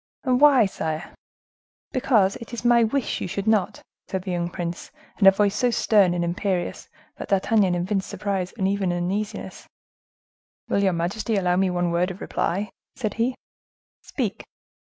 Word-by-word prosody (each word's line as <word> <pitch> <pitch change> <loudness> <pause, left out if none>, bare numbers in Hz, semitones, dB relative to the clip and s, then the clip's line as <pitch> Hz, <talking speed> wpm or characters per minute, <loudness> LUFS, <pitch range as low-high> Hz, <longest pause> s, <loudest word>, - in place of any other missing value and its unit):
"And 255 -1 +1
why, 275 -6 +7
sire?" 160 -4 -4 0.8
"Because 220 -7 +2
it 230 - -11
is 235 - -7
my 240 -1 +5
wish 250 +3 -1
you - - -2
should 195 +2 -4
not!" 215 -4 +1 0.2
said 190 -1 -3
the 185 - -4
young 175 -1 -1
prince, 175 -1 -5 0.3
in 195 - +6
a - - +11
voice 200 0 +1
so 250 - +2
stern 205 -6 +3
and 175 - 0
imperious 180 +1 -2 0.3
that - - -6
D'Artagnan 195 -1 +2
evinced 190 +2 -1
surprise 195 -3 -2
and 190 -3 +1
even 195 -2 0
uneasiness. 190 +5 -4 1.0
"Will 200 - +2
your 190 -2 +2
majesty 200 +7 -1
allow 180 -3 +2
me 190 +1 +2
one 175 -1 0
word 175 +2 +1
of 185 +1 -8
reply?" 195 +3 -2 0.2
said 215 -5 -3
he. 240 +3 0 0.7
"Speak." - - -4
195 Hz, 165 wpm, -24 LUFS, 180-220 Hz, 1.0 s, a